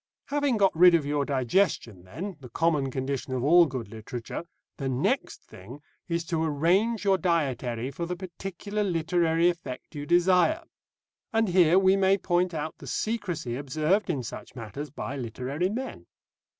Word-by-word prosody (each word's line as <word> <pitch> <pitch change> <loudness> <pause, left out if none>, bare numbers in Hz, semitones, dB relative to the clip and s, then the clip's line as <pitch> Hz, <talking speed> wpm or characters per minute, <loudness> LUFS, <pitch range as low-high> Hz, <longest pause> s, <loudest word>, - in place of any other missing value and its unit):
Having 285 -4 +1
got 195 -4 +3
rid 175 +1 +7
of 160 -4 +1
your 145 0 0
digestion, 130 - 0
then, 180 - -6
the 130 -3 -11
common 150 0 +1
condition 130 0 -3
of 125 - -2
all 170 +4 +6
good 130 -5 -5
literature, 115 +6 -6 0.3
the 135 -2 -2
next 130 0 -1
thing 115 +10 -12 0.3
is 170 -1 -1
to 165 -1 -1
arrange 180 +9 +1
your 195 -1 +3
dietary 135 -7 -1
for 170 +5 -4
the 180 - -3
particular 195 +3 -4
literary 165 -2 +2
effect 165 -8 -4
you 145 -1 -6
desire. 180 - +3 0.7
And 225 -2 +2
here 175 -1 +5
we 190 0 +5
may 195 0 +4
point 180 -1 +1
out 155 +1 -4
the - - -10
secrecy 190 - -2
observed 155 +9 0
in 140 -7 -1
such - - -8
matters 120 +5 -6
by 140 -1 -5
literary 130 +8 -2
men. 255 +6 -5
165 Hz, 160 wpm, -27 LUFS, 135-185 Hz, 0.7 s, rid